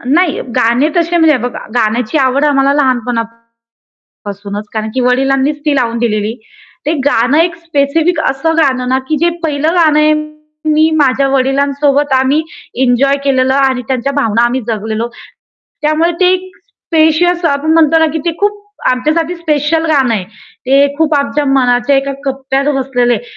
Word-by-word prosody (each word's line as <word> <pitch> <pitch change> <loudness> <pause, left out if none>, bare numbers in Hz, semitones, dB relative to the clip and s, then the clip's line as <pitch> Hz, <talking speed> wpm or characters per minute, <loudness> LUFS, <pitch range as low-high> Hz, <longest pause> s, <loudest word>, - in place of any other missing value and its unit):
नाही, 350 -3 +1 0.2
गाणे 235 +6 +2
तसे 345 0 +1
म्हणजे 320 -2 +4
बघा 245 0 -5 0.2
गाण्याची 230 +3 0
आवड 270 +1 +1
आम्हाला 275 -1 +2
लहानपणापासूनच 240 -4 -2 1.2
कारण 220 0 -3
की 260 - -1
वडिलांनीच 270 +3 +1
ती 295 -2 +2
लावून 235 -3 0
दिलेली. 215 -2 -1 0.5
ते 305 - +1
गाणं 265 0 +2
एक 335 +1 +2
स्पेसिफिक 320 +2 0
असं 325 +5 -1
गाण 270 -5 +2
ना, 260 - +2
की 265 +4 -3
जे 340 - +2
पहिलं 305 +1 0
गाणं 310 -3 +3
आहे 305 0 +4 0.6
मी 310 +1 +3
माझ्या 275 -1 +2
वडिलांसोबत 280 +1 +1
आम्ही 265 +4 +2 0.4
एन्जॉय 265 +2 +2
केलेलं 260 -1 +1
आणि 265 -2 +1
त्यांच्या 265 +1 -2
भावना 230 -6 +1
आम्ही 250 +2 -1
जगलेलो. 220 +1 -3 0.8
त्यामुळे 310 +3 +1
ते 365 0 +4
एक 370 0 -3
स्पेशियस 345 -5 0
आपण 310 0 +1
म्हणतो 325 0 +4
ना, 320 - +3
की 320 - -2
ते 340 - 0
खूप 410 0 0 0.3
आमच्यासाठी 310 +7 -1
स्पेशल 320 -1 -1
गाणं 270 -6 +2
आहे. 195 -4 -3 0.4
ते 275 +2 +4
खूप 315 -1 +1
आमच्या 285 +1 0
मनाच्या 255 0 +2
एका 275 +1 -1
कप्प्यात 270 0 -2
बसलेलं 255 -2 0
आहे. - - -2
280 Hz, 155 wpm, -13 LUFS, 255-315 Hz, 1.2 s, म्हणजे